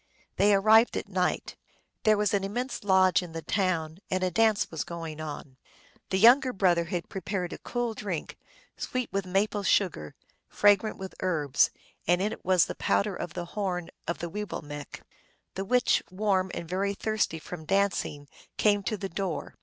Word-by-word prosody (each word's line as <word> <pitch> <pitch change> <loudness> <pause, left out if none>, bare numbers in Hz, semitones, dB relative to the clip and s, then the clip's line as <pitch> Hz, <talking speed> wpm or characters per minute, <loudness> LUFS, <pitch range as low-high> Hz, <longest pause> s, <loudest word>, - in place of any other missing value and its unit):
They 205 +1 +5
arrived 220 +4 +5
at - - -4
night. 185 -2 -1 0.5
There 215 -1 +5
was 210 -1 +1
an 200 -1 +1
immense 245 +7 -3
lodge 190 -3 +4
in 175 -2 -9
the 165 -1 -5
town, 175 -4 -1
and 185 0 0
a 185 - +1
dance 220 +3 +2
was 160 -3 -2
going 165 -2 -6
on. 145 -3 -7 0.5
The 190 - +1
younger 255 +6 +6
brother 175 -4 +2
had 170 0 -4
prepared 190 -2 -4
a - - -8
cool 240 -2 -2
drink, 200 -7 -5 0.4
sweet 255 -1 -3
with 195 -1 -1
maple 205 +3 +1
sugar, 180 - +1 0.3
fragrant 205 +1 +3
with 190 0 -7
herbs, 150 -7 +2 0.4
and 175 +1 +4
in 205 +3 0
it - - -8
was 185 -1 +4
the - - -5
powder 200 -1 0
of 175 - -6
the 175 -1 -3
horn 180 -4 -2 0.2
of 170 - -1
the 170 - -4
Weewillmekq. 145 -8 -6 0.5
The 195 - -4
witch, 250 +4 +3
warm 190 -1 0
and 170 - -5
very 195 +3 -1
thirsty 215 -5 -1
from 160 0 -8
dancing, 190 -6 0 0.3
came 205 -1 +3
to 215 +2 -2
the 195 - -4
door. 190 -2 -4
190 Hz, 175 wpm, -28 LUFS, 170-205 Hz, 0.5 s, younger